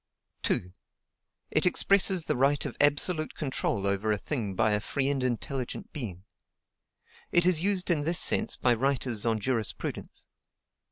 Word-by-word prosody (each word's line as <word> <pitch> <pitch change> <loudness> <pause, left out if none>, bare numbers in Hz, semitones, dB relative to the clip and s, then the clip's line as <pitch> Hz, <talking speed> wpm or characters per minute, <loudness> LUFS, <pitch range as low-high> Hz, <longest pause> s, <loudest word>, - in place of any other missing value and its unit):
2. 90 0 -1 0.8
It - - +3
expresses 190 -2 +3
the - - 0
right 140 +3 +1
of - - -5
absolute 155 +3 +1
control 130 -8 -2
over 100 +2 0
a 105 - +1
thing 105 -5 -3
by 110 0 +2
a 105 - +2
free 135 +5 -2
and 140 -2 -1
intelligent 125 +1 -4
being. 100 - -4 1.1
It 175 0 +4
is 180 -3 +4
used 190 -1 0
in 150 -4 +1
this 165 +3 +1
sense - - +2
by 125 - +2
writers 125 -3 -1
on 110 -1 +1
jurisprudence. 115 0 -3
130 Hz, 150 wpm, -28 LUFS, 110-155 Hz, 1.1 s, It